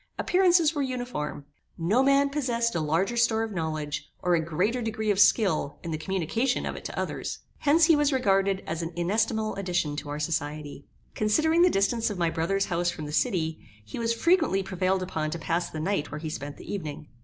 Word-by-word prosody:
Appearances 355 -4 +3
were 290 - -1
uniform. 245 - -4 0.3
No 190 +9 +2
man 275 +1 +3
possessed 235 -5 0
a 170 - 0
larger 165 +9 0
store 230 -1 +2
of 225 - -4
knowledge, 155 -4 -3
or 180 - +2
a 165 -2 +2
greater 185 +10 0
degree 220 -1 -1
of 200 - 0
skill 190 -9 +3
in 170 - -4
the 155 - -1
communication 195 - -1
of - - -3
it - - -8
to - - -4
others; - - -3 0.2
Hence 310 +3 +5
he 325 -1 +5
was 295 0 +2
regarded 195 -6 +2
as 165 +1 -3
an 165 +1 -5
inestimable 215 +5 0
addition 180 -6 -1
to 145 0 -5
our 145 +1 -4
society. 150 -2 -3 0.3
Considering 310 +11 +2
the 360 - +6
distance 225 - +1
of 205 - -4
my 170 -2 +1
brother's 195 +5 0
house 175 -1 0
from 155 -3 -5
the 150 - -6
city, 160 -4 0 0.3
he 105 - -7
was 230 0 0
frequently 315 - +2
prevailed 185 0 0
upon 160 -4 -2
to 165 - -4
pass 170 +1 -1
the 155 - -6
night 160 -2 -1
where 145 - -4
he 155 0 -5
spent 145 -1 -6
the - - -7
evening. 150 -6 -5
190 Hz, 205 wpm, -27 LUFS, 160-235 Hz, 0.3 s, the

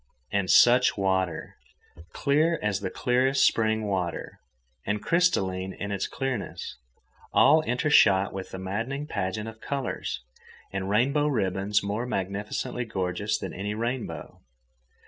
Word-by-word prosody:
And 100 -2 0
such 125 0 +6
water!—clear 95 - -1
as 105 -2 0
the 95 - -3
clearest 130 +5 +2
spring 110 -1 +2
water, 90 -5 -3 0.4
and 105 +1 -1
crystalline 95 - +1
in 100 0 -5
its 100 -1 -1
clearness, 125 - -4 0.5
all 155 +2 +6
intershot 115 -9 +3
with 95 -1 -6
a - - -6
maddening 115 +10 -3
pageant 105 -5 -3
of 110 0 -10
colours 135 - -3 0.5
and 95 0 -3
rainbow 140 +8 +2
ribbons 100 -5 0
more 105 +5 -2
magnificently 100 +4 -3
gorgeous 100 0 -2
than - - -6
any 105 +3 -4
rainbow. 120 +2 -4
105 Hz, 120 wpm, -27 LUFS, 95-125 Hz, 0.5 s, such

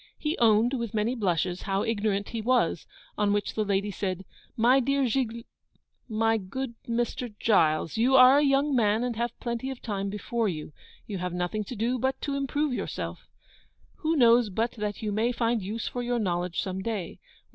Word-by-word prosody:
He 305 +2 -1
owned, 225 +2 +4
with 235 -4 -3
many 215 +3 +1
blushes, 180 -5 -1
how 195 -1 -1
ignorant 205 -2 -1
he 230 - -4
was; 230 -8 +1 0.3
on 205 -1 +2
which 205 0 0
the 215 - 0
lady 200 0 0
said, 190 -1 -3 0.3
'My 245 +4 +5
dear 275 +2 +1
Gigl 235 -2 -1 0.7
my 225 0 +2
good 235 +6 -5 0.2
Mr. 240 +1 -1
Giles, 160 -6 +2
you 250 +4 +3
are 260 +2 +8
a - - +3
young 275 0 +2
man, 220 -1 +2
and 245 -2 -2
have 235 +1 -3
plenty 235 +2 -3
of 265 -2 -6
time 200 -3 -3
before 215 +2 -1
you. 155 -3 -6 0.3
You 200 -3 -5
have 180 0 -3
nothing 180 +4 -2
to 250 - -7
do 235 +4 0
but 265 +2 -1
to 285 - -2
improve 280 +1 -1
yourself. - - -5 0.7
Who 320 +1 0
knows 235 -4 +5
but 225 +5 -1
that 210 -2 -4
you 210 - -1
may 220 +4 +1
find 230 -2 0
use 210 +4 -4
for 245 - -3
your 245 0 -1
knowledge 180 -4 -1
some 190 0 -4
day? 200 -5 -4
225 Hz, 190 wpm, -27 LUFS, 200-245 Hz, 0.7 s, are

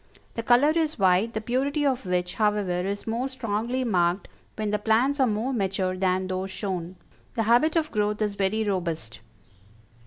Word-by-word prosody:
The 230 - -3
color 245 +6 +4
is 315 -1 0
white, 195 +3 +2
the 220 - -1
purity 275 +6 0
of 260 -7 0
which, 180 0 -1
however, 205 -4 0
is 200 +1 -4
more 235 +4 -2
strongly 240 0 -2
marked 180 -4 +1 0.3
when 215 -1 -2
the 210 - 0
plants 235 +7 +2
are 260 - +4
more 225 +5 -1
mature 190 -4 -1
than 185 0 0
those 185 +1 -3
shown; 185 -3 -4 0.4
the 225 - +1
habit 245 +9 +3
of 315 -2 +1
growth 210 -1 0
is 210 -2 0
very 200 +2 0
robust." 170 - -3
210 Hz, 175 wpm, -26 LUFS, 185-245 Hz, 0.4 s, color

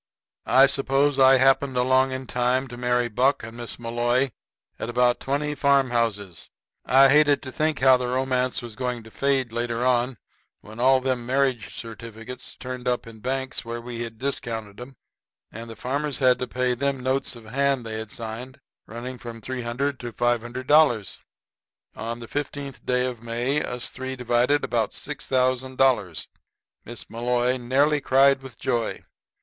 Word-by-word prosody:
] - - -69
I 135 +1 +7
suppose 140 +1 +1
I 130 0 +7
happened 135 0 +3
along 130 +1 +3
in 130 0 -4
time 125 +2 0
to 120 - -8
marry 125 0 +1
Buck 125 +5 +1
and 115 +1 -8
Miss 120 -1 -6
Malloy 120 +2 0 0.5
at - - -4
about 120 0 +2
twenty 145 +2 -1
farm 140 -2 +3
houses. 105 -7 -2 0.3
I 135 +1 +6
hated 150 0 +4
to 130 - -6
think 155 +1 0
how 130 -1 +7
the 125 0 -3
romance 130 0 0
was 115 -3 -8
going 125 -2 -3
to 110 - -14
fade 135 +1 0
later 120 +1 -2
on 125 0 +1 0.4
when 110 +2 -12
all 130 +1 +4
them 125 -2 -2
marriage 130 -4 0
certificates 115 +2 -8
turned 125 -1 -6
up 125 -1 0
in 115 -1 -12
banks 130 +3 -3
where 115 0 -5
we'd 120 -1 -6
discounted 115 -5 -4
'em, 135 +2 -10 0.6
and 115 +2 -8
the 115 - -8
farmers 140 +4 -2
had 130 -2 +3
to 125 - -3
pay 125 +1 0
them 135 +1 -1
notes 130 +1 -1
of 115 -2 -13
hand 135 +2 0
they'd 110 -1 -5
signed, 115 +6 -7 0.3
running 125 +2 -7
from 120 -2 -8
$300 130 +3 -3
to 120 -1 -6
$500. 120 - +2 0.8
On 115 +2 -5
the 115 - -9
15th 145 0 -5
day 125 0 +2
of 125 -3 -5
May 120 +5 -1
us 125 -1 -2
three 130 0 -5
divided 125 +3 +2
about 115 -3 0
$6,000. 130 - 0 0.6
Miss 120 0 -8
Malloy 125 +2 0
nearly 140 +4 +2
cried 135 +1 +4
with 130 -4 -11
joy. 120 -4 -2
125 Hz, 160 wpm, -24 LUFS, 120-135 Hz, 0.8 s, I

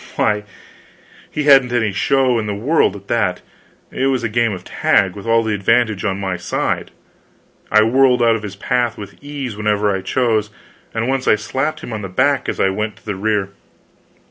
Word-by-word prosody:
Why, 105 0 +1 0.8
he 150 - -3
hadn't 135 -4 +5
any 110 -4 +1
show 130 +3 +2
in 105 - -3
the 105 - -2
world 120 - +1
at 100 0 -12
that; 100 -6 0 0.5
it 135 - 0
was 130 -3 0
a 115 - -1
game 115 +1 +1
of 90 -2 -6
tag, 95 0 +1
with 100 +2 -9
all 115 0 +3
the 110 -1 -1
advantage 110 0 +1
on 100 -2 -1
my 95 -2 -2
side; 90 - -2 0.8
I 110 +1 +6
whirled 125 +1 +3
out 115 -1 +4
of 110 - -4
his 100 -2 -7
path 120 +2 -1
with 100 +5 -11
ease 140 -6 -5
whenever 105 -1 0
I 95 - -3
chose, 110 -2 0 0.4
and 115 +1 -2
once 135 0 -1
I - - +6
slapped 140 +8 -3
him 120 - -6
on 110 - -4
the 95 - -6
back 135 +8 +1
as - - -4
I 95 - +3
went 105 +2 -3
to - - -23
the 105 -2 -3
rear. 105 0 -1
110 Hz, 200 wpm, -18 LUFS, 105-125 Hz, 0.8 s, I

